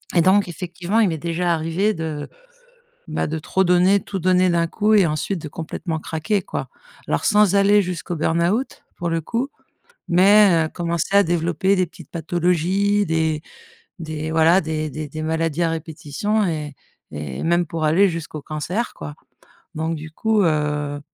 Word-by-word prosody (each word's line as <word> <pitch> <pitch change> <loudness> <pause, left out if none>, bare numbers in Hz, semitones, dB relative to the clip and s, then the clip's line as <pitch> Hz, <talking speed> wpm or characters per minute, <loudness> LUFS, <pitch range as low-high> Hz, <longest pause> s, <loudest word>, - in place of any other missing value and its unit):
et 170 - +6
donc 190 +2 +4
effectivement, 175 +5 -2
il 210 - +4
m'est 160 -2 -3
déjà 170 +1 0
arrivé 165 +7 0
de, 160 -3 -5 0.8
bah, - - -1
de 160 +1 -3
trop 190 +4 0
donner, 180 +3 +4
tout 195 - -6
donner 185 +1 +3
d'un 170 -1 +2
coup 215 +4 +1
et 200 -4 +6
ensuite 155 +3 -2
de 150 - -7
complètement 160 +1 -5
craquer, 160 +6 -1
quoi. - - -5 0.4
Alors - - 0
sans 210 -2 +4
aller 200 +1 +5
jusqu'au 180 -1 -4
burn-out, 170 - 0
pour 170 -1 -3
le 165 0 0
coup, 235 - -2 0.6
mais 185 -2 +5
heu, - - -12
commencer 170 +3 0
à 200 - +6
développer 175 +3 +1
des 185 -1 +2
petites 170 -2 -15
pathologies, 180 +5 +1
des 160 -2 0 0.6
des, 155 -1 -5
voilà, 165 +3 +4
des 155 -1 -3
des 155 +2 -5
des 155 +1 -6
maladies 160 +1 0
à 165 - +1
répétition 165 +6 -2
et 150 -4 -3 0.3
et 75 -3 -6
même 170 +1 +2
pour 165 0 -4
aller 185 +6 +4
jusqu'au 155 -2 -6
cancer, 170 +9 -3
quoi. 75 -1 -8 0.6
Donc, 160 +1 -2
du 155 +1 -9
coup, 220 +3 +1
heu, 150 -2 -1
170 Hz, 170 wpm, -21 LUFS, 155-190 Hz, 0.8 s, et